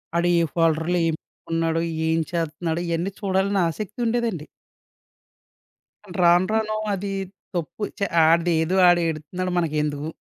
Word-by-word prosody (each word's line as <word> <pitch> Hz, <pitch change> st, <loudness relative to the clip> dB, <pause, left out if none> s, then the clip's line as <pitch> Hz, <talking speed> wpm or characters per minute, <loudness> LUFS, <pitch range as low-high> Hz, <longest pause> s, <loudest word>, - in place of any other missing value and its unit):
వాడు 170 Hz, +1 st, +2 dB
ఏ -, -, +3 dB
ఫోల్డర్‌లో 165 Hz, +1 st, +2 dB
ఏం 160 Hz, -, 0 dB
పెట్టుకున్నాడో? 165 Hz, 0 st, -2 dB, 0.3 s
ఏం 160 Hz, 0 st, +2 dB
చేత్తున్నాడో? 165 Hz, 0 st, -2 dB
ఇయన్నీ 170 Hz, +3 st, -1 dB
చూడాలని 195 Hz, 0 st, +1 dB
ఆసక్తి 210 Hz, +6 st, -6 dB
ఉండేదండి. 225 Hz, -9 st, -1 dB, 1.8 s
రాను, 175 Hz, +1 st, +5 dB
రాను 220 Hz, -1 st, 0 dB, 0.2 s
అది 200 Hz, +1 st, -3 dB, 0.4 s
తప్పు 175 Hz, +5 st, -4 dB, 0.2 s
ఛ -, -, -15 dB, 0.2 s
ఆడిదేదో 165 Hz, +1 st, +3 dB
ఆడు 175 Hz, 0 st, +5 dB
ఏడుత్తున్నాడు 165 Hz, +4 st, -3 dB
మనకెందుకు? 150 Hz, -2 st, -1 dB
170 Hz, 115 wpm, -23 LUFS, 160-190 Hz, 1.8 s, రాను